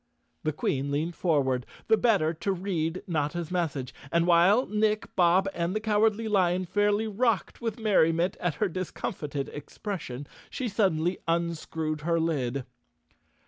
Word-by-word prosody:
The 155 - +1
Queen 140 -2 -1
leaned 155 +4 -1
forward, 135 -7 +1 0.2
the 220 - +6
better 200 -9 +2
to 185 +5 -2
read 180 -3 -2
Notta's 160 +1 -2
message 145 -8 -2 0.2
and, 170 0 +3
while 180 +8 +5
Nick, 215 0 0
Bob 185 +1 +4
and 170 +3 -1
the - - +1
Cowardly 220 +1 +2
Lion 185 -3 +2
fairly 205 +3 +1
rocked 220 0 0
with 230 -1 -3
merriment 180 -4 +3
at 175 -4 -1
her 210 - +1
discomfited 150 -5 -4
ex¬ 145 - -11
pression, 145 - -4 0.2
she 255 - -3
suddenly 185 -5 +1
unscrewed 160 -2 -1
her 165 +2 +1
lid. 140 -6 -1
175 Hz, 145 wpm, -28 LUFS, 155-205 Hz, 0.2 s, the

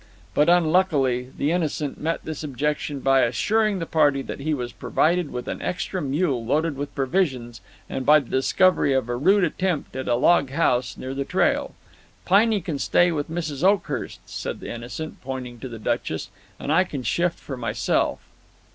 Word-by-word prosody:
But, 150 +7 +3
unluckily, 155 -8 +2
the 145 - +1
Innocent 155 -4 -2
met 165 +2 -1
this 155 -1 -5
objection 145 0 -2
by 135 0 +4
assuring 210 - +1
the 165 - -3
party 145 -4 +2
that - - -6
he 155 +3 -2
was 125 -5 -2
provided 170 0 +1
with 125 - -5
an - - -4
extra 185 0 -3
mule 140 -3 0
loaded 150 +6 0
with 140 +1 -6
provisions 130 - -1 0.3
and 135 - -4
by 150 +3 +6
the 135 - -10
discovery 140 +2 +3
of 130 -2 0
a 120 - 0
rude 190 +10 +3
attempt 175 -4 -1
at 130 - -4
a - - +3
log 140 +2 +3
house 130 -4 +1
near 130 +1 -5
the 140 0 -2
trail. - - 0 0.5
"Piney 210 +2 +4
can 160 -5 -4
stay 175 +4 +3
with 150 -2 -3
Mrs. 160 -4 -4
Oakhurst," 195 -1 0
said - - -5
the - - -6
Innocent, 120 +7 -7
pointing 125 -2 -6
to 130 - -7
the 115 - -7
Duchess, 110 - -2 0.3
"and 145 - -3
I 180 +3 +5
can 145 -8 -6
shift 170 +5 0
for 135 - -7
myself." 120 -2 0
145 Hz, 180 wpm, -24 LUFS, 130-175 Hz, 0.5 s, by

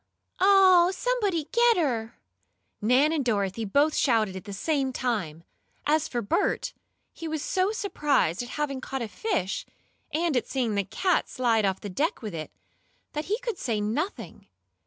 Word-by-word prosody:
"Oh, 375 -2 +6
somebody 405 -12 0
get 475 -2 +4
her!" 240 -9 -1 0.7
Nan 255 +8 +4
and 300 -4 0
Dorothy 210 -2 -1
both 285 +9 +3
shouted 220 -7 +2
at 190 - -7
the 205 - -7
same 270 +5 0
time. 205 -11 -2 0.4
As 310 +1 +2
for 240 -2 -3
Bert, 200 - 0 0.4
he 330 - -7
was 315 -2 -3
so 380 +2 +1
surprised 295 - 0
at 245 - -7
having 280 -3 -2
caught 265 -1 -4
a - - -3
fish, 215 - -2 0.5
and 325 -1 0
at 245 - 0
seeing 250 -5 -1
the 200 -1 0
cat 345 - 0
slide 230 -4 +1
off 190 -1 -1
the - - -5
deck 285 - -1
with 210 -4 -5
it, 155 -1 -5 0.6
that 300 +1 -3
he 420 +3 0
could 470 -6 -4
say 225 -4 -1
nothing. 235 - -3
270 Hz, 165 wpm, -27 LUFS, 215-340 Hz, 0.7 s, Oh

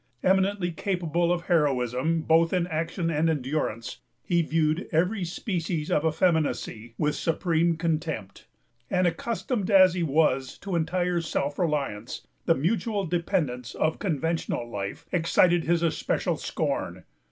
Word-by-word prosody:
Eminently 190 -1 +2
capable 175 -1 0
of 175 -1 0
heroism, 150 -1 +1
both 165 +2 +3
in 180 -2 +2
action 165 +1 -2
and 160 +1 +2
endurance, 135 -6 -2 0.2
he 170 -2 +2
viewed 155 +2 0
every 180 +5 +1
species 170 -3 -3
of 150 - +2
effeminacy 155 -8 0
with 150 -1 +1
supreme 165 0 +1
contempt; 160 - -3 0.4
and, 185 -1 +2
accustomed 220 +3 -1
as 190 -3 +7
he 180 - -2
was 140 -4 +1
to 195 -3 -4
entire 175 +1 0
self 145 -3 -2
reliance, 145 - -2 0.2
the - - +5
mutual 205 - 0
dependence 160 - -1
of 155 0 0
conventional 165 - -1
life 100 -4 -5
excited 175 0 +3
his 170 0 +2
especial 165 - 0
scorn. - - -3
165 Hz, 130 wpm, -26 LUFS, 150-180 Hz, 0.4 s, as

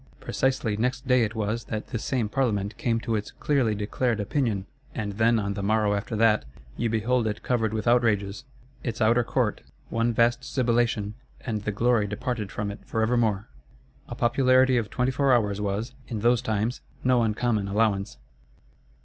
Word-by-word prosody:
Precisely 130 -5 0
next 125 +5 -1
day 125 -1 +4
it 110 +1 -2
was, 110 +1 -2
that 110 0 -5
this 115 - -4
same 125 -5 0
Parlement 105 -4 -1
came 115 +1 0
to 115 -1 -2
its 105 -1 -3
"clearly 130 -7 +1
declared 110 +3 -1
opinion:" 105 -2 -1 0.3
and 105 -2 -2
then 115 +1 +4
on 100 -2 -1
the 100 - -4
morrow 105 0 +2
after 100 +2 -3
that, 110 0 +3 0.3
you 120 - -1
behold 115 +2 +1
it 105 0 -4
"covered 115 -4 +1
with 110 0 -3
outrages"; 105 -4 +2 0.4
its 115 -2 -3
outer 120 +2 +4
court, - - 0 0.3
one 115 +1 +1
vast 115 +1 +2
sibilation, 115 -4 0 0.3
and 110 -5 -4
the 105 - 0
glory 115 0 +2
departed 105 0 -3
from 105 -1 -3
it 100 - -9
for 110 - -1
evermore. 110 -3 +1 0.6
A - - -6
popularity 130 +2 +4
of 115 -4 0
twenty 125 +1 0
four 140 +1 +2
hours 105 -4 +1
was, 105 +4 -2
in 110 -4 -4
those 120 +1 +3
times, 110 +3 -1 0.2
no 125 -1 +4
uncommon 110 -2 0
allowance. 100 - 0
115 Hz, 175 wpm, -26 LUFS, 105-120 Hz, 0.6 s, day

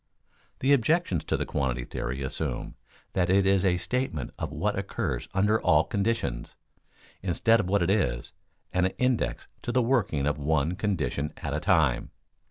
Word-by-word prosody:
_ - - -38
The 135 +2 +4
objections 140 - +2
to - - 0
the - - -2
quantity 65 -3 -1
theory 65 +2 -4
assume 65 - -3 0.4
that 90 -1 +1
it 95 +1 +4
is 95 -1 +3
a 90 -2 +3
statement 90 - -2
of - - -3
what - - -1
occurs - - -3
under 105 +3 +2
all - - +4
conditions, 100 - -2 0.7
instead 115 +5 +3
of 105 - -1
what 100 0 +2
it 90 - +2
is, 65 - 0 0.4
an 90 0 +3
index 125 - 0
to - - -3
the 125 0 +2
working 115 - +1
of 75 0 0
one 75 +3 +1
condition 85 -8 -1
at 70 - -4
a 75 - 0
time. 80 - +2
90 Hz, 170 wpm, -27 LUFS, 70-110 Hz, 0.7 s, The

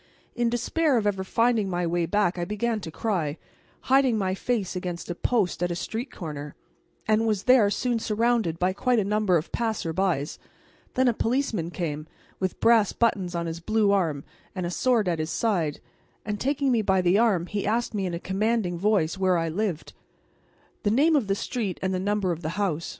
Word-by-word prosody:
In 240 -1 +1
despair 275 +4 +1
of 220 - 0
ever 195 -2 0
finding 230 0 +1
my 175 -1 -1
way 170 0 0
back 200 -3 +1
I - - -1
began 215 +4 -1
to 180 - -7
cry, 165 -5 -2 0.4
hiding 265 -3 +3
my 190 -2 0
face 200 -2 -2
against 180 -1 -4
a - - -1
post 195 -1 0
at 175 - +1
a 175 - -2
street 225 +8 -4
corner, 150 -4 -7 0.5
and 220 +1 +3
was 210 -3 0
there 250 -5 +5
soon 235 +3 0
surrounded 225 -5 +1
by 180 +2 +1
quite 250 +5 +1
a 215 - +3
number 205 -2 +2
of 155 - -5
passers 220 -8 -2
by; 180 -6 +1 0.7
then 260 0 +3
a 240 - +4
policeman 225 - -1
came 155 -3 -4
up, - - -31
with 185 -1 -2
brass 225 -3 +4
buttons 190 -6 0
on 170 0 -1
his 165 0 -4
blue 215 +4 +1
coat 165 -8 +1 0.3
and 185 -2 -2
a 175 - -3
sword 230 0 +2
at 170 -2 0
his 155 +1 -2
side, 170 -11 0 0.5
and 210 0 -3
taking 280 0 +1
me 235 -3 +3
by 190 -2 +2
the 180 +3 +3
arm 205 -8 +2
he 205 +2 -3
asked 230 +3 0
me 195 -3 -1
in 175 - -3
a - - -4
commanding 195 -2 -1
voice 190 -4 +1
where 185 -2 +3
I 165 0 -1
lived 180 -1 -3 0.9
the 205 - +1
name 295 +9 +4
of 265 -8 +1
the 195 - +1
street 220 -3 -3
and 190 0 0
the 185 - -1
number 200 -1 0
of 170 -1 -4
the 165 +3 -4
house. 170 -6 -1
200 Hz, 205 wpm, -26 LUFS, 175-225 Hz, 0.9 s, there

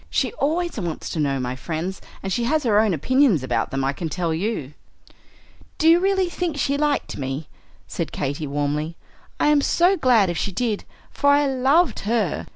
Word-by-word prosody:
"She - - 0
always 340 - -1
wants 170 -5 -4
to 165 - -3
know 140 -2 0
my 125 0 -3
friends; 170 +7 -4 0.2
and 195 -1 -2
she 235 +4 0
has 305 +4 +1
her 215 -4 +3
own 215 -2 +3
opinions 215 - +2
about 130 - -1
them, 135 0 -2
I 135 +1 0
can 165 +2 -4
tell 170 0 -1
you." 160 - -3 1.0
"Do 320 - +2
you 335 +1 +7
really 380 0 +2
think 345 -3 -3
she 280 0 0
liked 295 0 -1
me?" 135 +3 -4 0.4
said - - -4
Katy, 145 +2 -3
warmly. 145 +3 -2 0.4
"I - - +3
am 295 -1 +4
so 355 +6 +3
glad 230 - +3
if 170 - -3
she 200 - -2
did, 215 +1 -2 0.3
for 285 - +1
I 285 +1 +4
loved 270 +2 +2
her. 215 -5 -1
210 Hz, 190 wpm, -22 LUFS, -, 1.0 s, you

